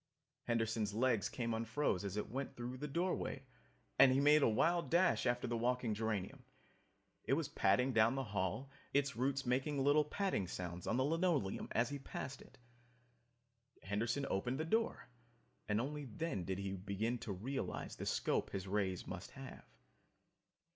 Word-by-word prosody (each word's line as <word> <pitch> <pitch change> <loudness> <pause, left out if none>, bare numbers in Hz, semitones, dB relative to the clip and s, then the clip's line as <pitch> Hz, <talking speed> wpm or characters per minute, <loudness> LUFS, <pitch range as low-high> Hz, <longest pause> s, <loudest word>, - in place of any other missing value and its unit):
Henderson's 115 -3 0
legs 120 -3 +2
came 120 -2 -2
unfroze 115 -2 0
as 100 0 -3
it 105 - -2
went 135 +2 -4
through 120 +1 -5
the 150 - -4
doorway 170 +6 -1 0.6
and 135 -1 +9
he 130 - +3
made 150 +2 +6
a 135 - +5
wild 170 +10 +2
dash 175 -5 +3
after 120 0 +1
the 120 -1 -1
walking 120 -1 +1
geranium. 105 -3 -2 0.8
It - - +2
was - - +1
padding 125 +7 +2
down 115 +2 +4
the 135 - -1
hall, 105 +5 -2 0.2
its 140 -3 +2
roots 135 +3 0
making 135 +4 +1
little 145 +3 +4
patting 150 - -1
sounds 90 -1 -5
on 110 - +1
the 130 - +3
linoleum 160 - +1
as 120 - +2
he 145 0 -4
passed 135 0 -6
it. 135 - -16 1.3
Henderson 115 +8 -1
opened 125 +8 -1
the 160 - -1
door, 225 +7 0 0.6
and 105 +1 +2
only 145 +4 -3
then 110 - -3
did 95 0 -2
he 100 0 -3
begin 100 +5 -2
to 105 - -5
realize 125 +9 -4
the - - -4
scope - - +1
his 95 0 -4
rays 95 -2 -1
must - - -6
have! - - -9
120 Hz, 165 wpm, -37 LUFS, 105-140 Hz, 1.3 s, and